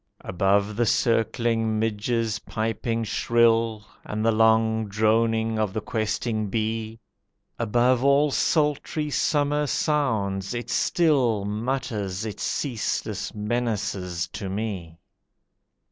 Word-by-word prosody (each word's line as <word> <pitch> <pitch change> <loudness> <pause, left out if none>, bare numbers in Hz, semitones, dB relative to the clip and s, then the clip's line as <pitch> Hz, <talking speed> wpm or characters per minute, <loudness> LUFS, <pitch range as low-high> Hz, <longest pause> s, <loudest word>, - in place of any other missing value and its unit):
Above 100 +3 +1
the 120 - +2
circling 115 -1 +1
midge's 110 0 -1
piping 115 +1 -2
shrill, 115 -1 +2 0.2
And 110 +1 -3
the 115 - +4
long 110 0 +3
droning 110 +1 +1
of 105 -3 0
the 110 - -1
questing 110 -2 -2
bee, 110 +1 -2 0.6
Above 120 +2 +2
all 140 +1 +4
sultry 150 0 0
summer 145 0 +1
sounds, 110 - 0
it 120 - -4
still 130 - +2
Mutters 110 -3 -3
its 105 - -6
ceaseless 125 -7 -2
menaces 105 -6 -2
to 95 - -6
me. 95 -5 -4
110 Hz, 100 wpm, -25 LUFS, 105-120 Hz, 0.6 s, the